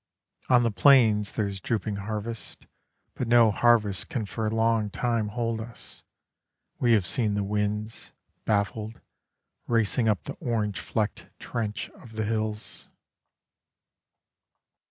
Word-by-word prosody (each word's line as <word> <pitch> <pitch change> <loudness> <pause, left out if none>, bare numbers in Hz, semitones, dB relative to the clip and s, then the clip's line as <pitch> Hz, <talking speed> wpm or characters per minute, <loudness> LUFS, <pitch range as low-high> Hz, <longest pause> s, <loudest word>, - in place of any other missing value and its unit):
On 125 -1 +6
the 115 - +2
plains 105 -1 +5
there 105 -2 0
is 100 -1 -5
drooping 105 +1 -2
harvest, 110 +3 -5 0.5
But 125 - -3
no 120 -2 +6
harvest 105 -3 +2
can 115 -5 -2
for 110 +2 -2
long 110 -1 +1
time 115 0 0
hold 115 +1 -2
us, 115 0 -11 0.8
We 120 -2 +4
have 105 -5 +3
seen 105 0 +1
the 105 - 0
winds, 105 +2 -2 0.3
baffled, 105 +1 -1 0.7
Racing 115 0 +2
up 105 -4 +1
the - - -6
orange 105 -5 -1
flecked 110 -3 -2
trench 110 -3 -4
of 115 - -15
the 110 0 -2
hills. 110 -1 -3
110 Hz, 125 wpm, -27 LUFS, 105-115 Hz, 0.8 s, On